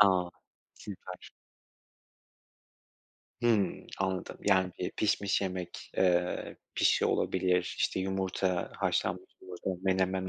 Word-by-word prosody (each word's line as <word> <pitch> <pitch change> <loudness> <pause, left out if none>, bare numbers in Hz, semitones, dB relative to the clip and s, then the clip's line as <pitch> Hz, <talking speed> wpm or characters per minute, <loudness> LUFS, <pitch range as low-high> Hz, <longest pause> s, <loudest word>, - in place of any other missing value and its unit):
A, 95 -3 +5 0.4
süper. 95 -3 -9 2.1
Hımm, 110 -5 +2
anladım. 95 -1 -2
Yani 95 -2 +3
bir 90 - -2
pişmiş 100 -1 +1
yemek, 90 -2 -4
eee, 90 -1 +2 0.2
pişi - - +4
olabilir, 90 -1 +1
işte, - - +1
yumurta 95 -1 -1
haşlanmış - - -1
yumurta, 90 +1 -4
menemen 95 0 +1
95 Hz, 95 wpm, -31 LUFS, 90-95 Hz, 2.1 s, A